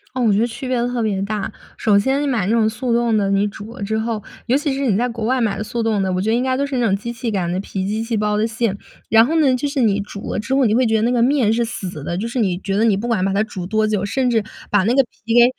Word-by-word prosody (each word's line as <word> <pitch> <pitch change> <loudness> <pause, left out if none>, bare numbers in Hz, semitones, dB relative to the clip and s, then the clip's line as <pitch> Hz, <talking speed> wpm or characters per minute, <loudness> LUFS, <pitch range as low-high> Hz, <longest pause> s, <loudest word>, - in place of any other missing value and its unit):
嗯， 250 - +1
我 205 - +4
觉 200 - +2
得 230 - +3
区 245 +3 -7
别 255 -1 0
特 245 -1 -2
别 205 -3 0
大。 205 0 -2 0.3
首 210 -2 +3
先 265 +7 +1
你 290 - 0
买 235 -8 0
那 200 - 0
种 225 -1 +3
速 235 +2 -2
冻 235 -1 +2
的， 200 -2 +1
你 200 +1 +2
煮 210 +2 -9
了 240 - -11
之 220 +2 -1
后 220 -1 -2 0.3
尤 250 +3 +3
其 290 -1 -1
是 275 - -3
你 210 -6 +2
在 245 +3 +1
国 230 -2 -5
外 255 +3 +1
买 220 -4 0
的 - - -3
速 235 +2 -3
冻 215 -3 +1
的， 190 - -1
我 185 - 0
觉 215 - -1
得 225 - +3
应 245 - +1
该 260 0 0
都 280 - 0
是 280 - -4
那 240 - +2
种 195 - +2
机 235 +4 -5
器 235 -1 -3
擀 180 -4 -1
的 180 - -1
皮， 190 -1 -4
机 215 +2 -1
器 230 -1 -2
包 210 0 0
的 210 +1 +1
馅。 225 -3 -1 0.3
然 225 0 +6
后 320 +5 +1
呢， 270 -4 +4
就 285 +3 -2
是 280 -1 -2
你 205 -4 +2
煮 200 0 -6
了 - - -2
之 220 +5 -3
后， 270 -2 +3
你 215 - +2
会 255 +1 +3
觉 220 -1 +2
得 - - 0
那 240 - +2
个 240 - +2
面 245 -4 +3
是 235 - +1
死 190 - -5
的， 170 +4 -3
就 220 +5 -2
是 245 +2 -3
你 190 -6 +1
觉 195 0 -3
得 215 - +2
你 215 -4 +3
不 225 +4 -3
管 225 -6 +1
把 195 - +1
它 200 - +1
煮 185 -5 -6
多 215 +2 +1
久， 210 -2 0
甚 255 +4 0
至 225 -3 +2 0.3
把 205 -2 +3
那 230 +5 +2
个 275 - +6
皮 230 -1 -6
给 240 0 +7
225 Hz, 360 characters per minute, -20 LUFS, 205-245 Hz, 0.3 s, 给